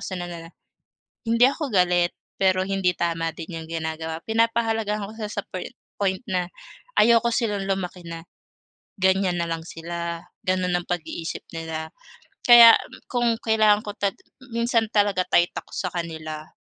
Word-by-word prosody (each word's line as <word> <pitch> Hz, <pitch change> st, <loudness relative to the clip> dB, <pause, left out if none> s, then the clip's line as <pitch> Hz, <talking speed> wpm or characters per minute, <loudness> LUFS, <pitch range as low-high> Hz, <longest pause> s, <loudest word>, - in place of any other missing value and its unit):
ko -, -, -11 dB
sa 185 Hz, -, -4 dB
kanila 170 Hz, -1 st, -7 dB, 0.8 s
hindi 230 Hz, +2 st, +4 dB
ako 280 Hz, +1 st, -1 dB
galit, 180 Hz, -2 st, +3 dB, 0.3 s
pero 185 Hz, -1 st, +3 dB
hindi 195 Hz, -2 st, +1 dB
tama 165 Hz, -1 st, 0 dB
din 165 Hz, +1 st, -7 dB
yung 160 Hz, -, -12 dB
ginagawa. 160 Hz, 0 st, -4 dB
Pinapahalagahan 225 Hz, -2 st, +1 dB
ko 215 Hz, -, -11 dB
sila 210 Hz, -2 st, -4 dB
sa 205 Hz, -, -3 dB
poin 185 Hz, -, -5 dB, 0.3 s
point 190 Hz, -2 st, +1 dB
na 180 Hz, -3 st, -1 dB, 0.5 s
ayoko 235 Hz, +1 st, +5 dB
silang 210 Hz, -4 st, 0 dB
lumaki 185 Hz, -2 st, -3 dB
na 165 Hz, 0 st, -7 dB, 0.8 s
ganyan 190 Hz, -1 st, +2 dB
na 170 Hz, -, 0 dB
lang 165 Hz, 0 st, -3 dB
sila, 170 Hz, 0 st, -5 dB, 0.2 s
ganun 185 Hz, -1 st, +1 dB
ang 175 Hz, -, +1 dB
pag-iisip 170 Hz, -1 st, -4 dB
nila. 160 Hz, -1 st, -5 dB, 0.6 s
Kaya 235 Hz, -1 st, +10 dB, 0.4 s
kung 240 Hz, -2 st, +2 dB
kailangan 215 Hz, -1 st, +4 dB
ko 205 Hz, -, -4 dB
ta 200 Hz, -1 st, +1 dB, 0.4 s
minsan 235 Hz, -1 st, +2 dB
talaga 205 Hz, -3 st, +3 dB
tight 175 Hz, +1 st, +4 dB
ako -, -, -19 dB
sa 185 Hz, -, -2 dB
kanila. 160 Hz, -2 st, -6 dB
185 Hz, 150 wpm, -24 LUFS, 170-215 Hz, 0.8 s, Kaya